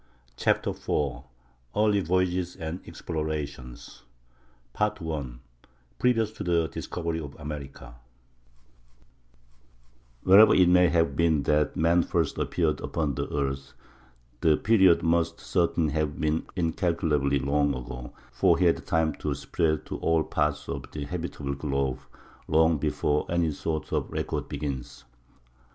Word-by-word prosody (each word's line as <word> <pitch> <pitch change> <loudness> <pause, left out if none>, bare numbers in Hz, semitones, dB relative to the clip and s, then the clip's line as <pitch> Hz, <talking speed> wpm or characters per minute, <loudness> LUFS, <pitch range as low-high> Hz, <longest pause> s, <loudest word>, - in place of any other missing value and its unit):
] 65 - -34
CHAPTER - - +2
IV 70 -3 -2 0.5
EARLY 105 -1 +3
VOYAGES 90 0 0
AND 80 +3 -5
EXPLORATIONS 75 -6 -5 0.7
PART 105 0 0
I—PREVIOUS 65 - -3
TO - - -7
THE 85 -2 +1
DISCOVERY 85 -2 -4
OF 70 -3 -8
AMERICA 70 -5 -8 2.3
Wherever 100 +3 +7
it 90 -1 +5
may 90 -1 +5
have 80 -4 +1
been 80 -2 +2
that 75 0 +1
man 85 +2 +4
first 85 -3 -1
appeared - - 0
upon 75 -4 -1
the - - -4
earth, 70 -1 -3 0.7
the 80 +1 +4
period 95 -6 +4
must 85 0 +1
certainly 85 -3 0
have 75 -1 -1
been 75 +1 0
incalculably 80 -5 +1
long 70 +1 +1
ago, 60 -1 -7 0.2
for - - +3
he 90 - +2
had 70 -6 +2
time 80 -2 +1
to 75 -2 -2
spread 80 +3 -1
to - - -5
all 80 -1 +2
parts 75 -1 -1
of - - -4
the 75 -1 -4
habitable 80 -4 -4
globe 70 -2 -2 0.5
long 80 0 +3
before 75 +1 0
any 85 -2 +1
sort 80 +1 -4
of - - -1
record - - -3
begins. 70 -5 -5
80 Hz, 130 wpm, -27 LUFS, 70-85 Hz, 2.3 s, Wherever